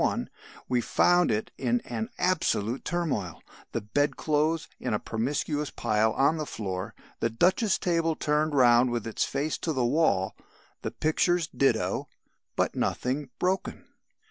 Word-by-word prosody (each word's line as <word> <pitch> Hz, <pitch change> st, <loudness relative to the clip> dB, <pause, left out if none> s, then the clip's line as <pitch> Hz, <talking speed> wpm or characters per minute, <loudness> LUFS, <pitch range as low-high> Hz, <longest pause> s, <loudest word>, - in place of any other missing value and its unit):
1) -, -, 0 dB, 0.4 s
we 125 Hz, -1 st, +1 dB
found 175 Hz, +7 st, +3 dB
it 110 Hz, -1 st, -1 dB
in 120 Hz, -2 st, +1 dB
an 115 Hz, -1 st, -4 dB
absolute 135 Hz, -, 0 dB
turmoil: 140 Hz, -, -2 dB, 0.3 s
the -, -, -2 dB
bed 145 Hz, +8 st, 0 dB
clothes 155 Hz, +2 st, +1 dB
in 120 Hz, -4 st, -1 dB
a -, -, -1 dB
promiscuous 145 Hz, +5 st, -2 dB
pile 110 Hz, -1 st, +1 dB
on 140 Hz, +4 st, +3 dB
the 155 Hz, -, -2 dB
floor, 95 Hz, -6 st, -4 dB, 0.2 s
the 115 Hz, -, +1 dB
duchess 185 Hz, -, +2 dB
table 165 Hz, -2 st, +1 dB
turned 150 Hz, 0 st, 0 dB
round 125 Hz, -1 st, +5 dB
with 120 Hz, -2 st, -2 dB
its 115 Hz, -, -1 dB
face 140 Hz, +1 st, -2 dB
to 165 Hz, -, -2 dB
the 130 Hz, -5 st, 0 dB
wall, 120 Hz, -, +2 dB, 0.5 s
the -, -, -2 dB
pictures 170 Hz, +2 st, +1 dB
ditto 140 Hz, -2 st, 0 dB, 0.5 s
but -, -, +1 dB
nothing 130 Hz, +2 st, -1 dB
broken. 190 Hz, +1 st, -1 dB
140 Hz, 145 wpm, -28 LUFS, 115-160 Hz, 0.5 s, round